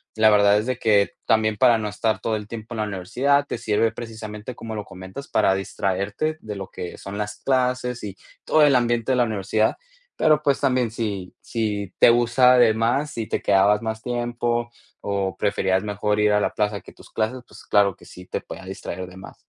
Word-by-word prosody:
La 110 0 +5
verdad, 100 0 +5
es 105 - -3
de 130 -1 -1
que 105 -3 +3
también, 110 -1 +2
para 120 0 +5
no 105 - -3
estar 110 +1 -1
todo 110 - -1
el 105 -1 -6
tiempo 115 +1 -8
en - - -5
la - - +1
universidad, 120 +9 +1
te - - -3
sirve 115 0 +1
precisamente, 110 0 -7
como 115 -1 -7
lo 105 - -5
comentas, 95 +9 -9
para 95 - +3
distraerte 100 - -2
de 105 -1 -6
lo 95 -1 -7
que 90 - -7
son 100 +1 -7
las 105 0 -4
clases 125 -2 0
y 100 -2 -6 0.3
todo 155 - +3
el 145 -2 +5
ambiente 120 0 +1
de - - +1
la 125 - +4
universidad. 110 0 0 0.4
Pero, 155 -1 +3
pues, 140 -2 +2
también 125 -4 +1
si 100 -5 -4
si 105 -4 -3
te - - +8
gusta 120 +2 +4
de 115 -3 +6
más, 120 +7 0
si 115 -5 -4
te - - -2
quedabas 100 +2 +3
más 110 -1 -4
tiempo 120 -1 -2 0.3
o 100 -2 -2
preferías 95 -1 +1
mejor 105 0 -1
ir 105 0 +3
a 105 - +3
la - - 0
plaza 105 -2 -1
que - - -14
tus - - -17
clases, 115 +4 -2
pues, 105 - -14
claro 100 -2 +3
que - - -18
sí, 90 - -12
te - - -3
podía 95 - -10
distraer 95 -1 -6
de 90 - -13
más. 95 - -13
110 Hz, 210 wpm, -23 LUFS, 100-120 Hz, 0.4 s, te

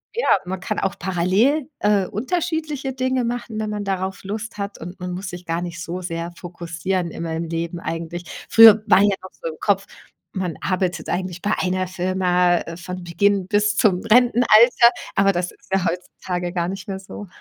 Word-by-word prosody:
ja, 475 - -1 0.2
man 185 +1 -4
kann 215 +3 -3
auch 195 - -2
parallel, 195 - +1
äh, 205 -2 +2
unterschiedliche 305 - -2
Dinge 260 0 0
machen, 235 -2 -3
wenn 215 -1 -2
man 210 -1 -3
darauf 190 0 -3
Lust 210 +3 -5
hat 200 0 -5
und 175 +3 -8
man 180 0 -4
muss 180 +1 -5
sich 175 0 -9
gar 165 +1 -2
nicht 170 -1 -6
so 180 +1 -5
sehr 170 -1 -4
fokussieren 175 +1 -3
immer 165 0 -4
im 165 - -2
Leben 165 +1 -3
eigentlich. 170 +1 -5 0.3
Früher 225 -2 +9
war - - +6
ja 200 -1 +3
noch 185 - -10
so - - -7
im 155 - -10
Kopf, 200 -1 +1 0.5
man 180 -4 -3
arbeitet 185 -1 -1
eigentlich 180 -1 -3
bei 205 - +1
1 185 0 0
Firma 180 -1 +1
von 180 +1 -7
Beginn 190 +3 +1
bis 210 +1 +2
zum 185 -4 +3
Rentenalter, 235 0 +6 0.3
aber 195 0 +4
das 180 -1 -2
ist - - -23
ja 195 -1 +1
heutzutage 180 0 -4
gar 175 -1 -1
nicht 195 0 -6
mehr 190 -1 -4
so. 195 +1 -9
185 Hz, 185 wpm, -22 LUFS, 175-210 Hz, 0.5 s, Früher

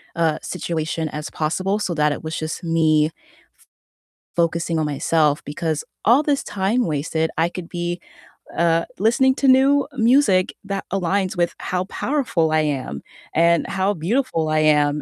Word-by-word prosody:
uh, 160 -2 +1
situation 160 -2 -3
as 150 0 -6
possible 185 +6 -1
so 185 -4 -2
that 150 -1 +2
it 145 - -8
was 160 0 -4
just 155 +3 -5
me 160 -2 +3
f - - -10 1.2
focusing 170 0 0
on 155 - 0
myself, 150 +1 +1
because 155 +1 -3 0.2
all 240 +6 +6
this 290 -2 0
time 205 +5 0
wasted, 160 +1 -1
I 165 +1 +2
could 175 -1 -7
be, 175 0 -3 0.6
uh, 170 0 +2
listening 250 +6 +3
to 275 - 0
new 270 +2 +5
music 230 -6 +3
that 195 -1 -4
aligns 190 0 0
with 175 0 0
how 180 0 -2
powerful 205 - -1
I 155 - +3
am, 135 - -3 0.3
and 170 +1 +3
how 195 +1 0
beautiful 170 - -1
I 155 0 +2
am, 150 -1 +3
170 Hz, 155 wpm, -21 LUFS, 155-195 Hz, 1.2 s, all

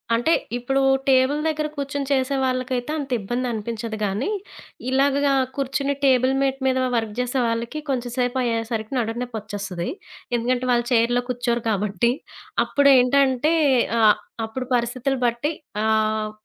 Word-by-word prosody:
అంటే 280 +8 +2 0.2
ఇప్పుడు 270 +3 0 0.3
టేబుల్ 265 +2 +4
దగ్గర 305 -1 -1
కూర్చొని 280 0 -3
చేసే 265 0 +1
వాళ్ళకైతే 255 +1 -1
అంత 280 -3 -5
ఇబ్బందనిపించదు 230 0 -3
కానీ, 205 - -1 0.6
ఇలాగ 275 +1 +3 0.4
కూర్చొని 275 +1 -1
టేబుల్ 260 0 +4
మేట్ 270 0 0
మీద 260 0 +2 0.2
వర్క్ 225 -2 -2
చేసే 250 +1 0
వాళ్ళకి 230 +6 -2
కొంచెం 245 -2 -2
సేపయ్యేసరికి 235 -2 -1
నడుం 225 0 -2
నొప్పి 245 -2 -5
వచ్చేస్తుంది. 200 -4 -5 0.5
ఎందుకంటే 250 +2 0
వాళ్ళు 240 0 +2
చైర్‌లో 245 +1 +3
కూర్చోరు 240 -1 -1
కాబట్టి, 210 +2 +1 0.5
అప్పుడేంటంటే 275 +1 +4 0.5
ఆహ్, 215 -1 +6 0.3
అప్పుడు 255 +3 -5
పరిస్థితులు 245 +3 -1
బట్టి 240 +6 0 0.3
ఆహ్, 215 -1 +1
245 Hz, 125 wpm, -23 LUFS, 230-270 Hz, 0.6 s, ఆహ్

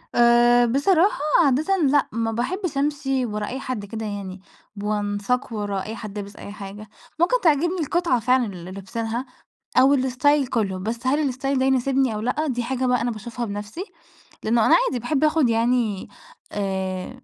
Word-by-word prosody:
آآ 240 0 +5
بصراحة 320 - +3 0.3
عادةً 310 +9 +2
لأ، 290 -4 +3
ما 225 0 -1
باحبش 300 - -2
أمشِي 275 -2 0
ورا 210 -2 -3
أي 260 - -4
حد 255 -6 -4
كده 220 +2 -6
يعني، 200 -2 -6 0.3
ب 200 - -7
وأنساق 210 +4 -1
ورا 205 -2 -2
أي 220 - -6
حد 210 -2 -8
لابس 200 0 -8
أي - - -9
حاجة، 205 +1 -9 0.3
ممكن 460 +9 +3
تعجبني 345 +2 +2
القطعة 335 -3 +1
فعلًا 250 +2 +2
اللي 185 -3 -8
لابسينها 225 +5 -4 0.5
أو 275 +2 +6
الstyle 265 +2 +2
كلّه 200 -6 -1
بس 230 +6 -4
هل 280 +1 +2
الstyle 270 +2 -1
ده 260 - +2
يناسبني 265 -2 +2
أو 210 - -3
لأ، 250 +7 -1
دي 245 -4 -1
حاجة 255 +2 -1
بقى 250 -1 +2
أنا 240 - 0
باشوفها 235 +2 -5
بنفْسي، 210 - -5 0.6
لأنه 225 0 +2
أنا - - +6
عادي 260 - -1
باحب 270 +5 0
آخُد 305 -3 +3
يعني 230 -3 +1 0.4
آآ، 190 -2 -3
240 Hz, 170 wpm, -23 LUFS, 210-275 Hz, 0.6 s, أو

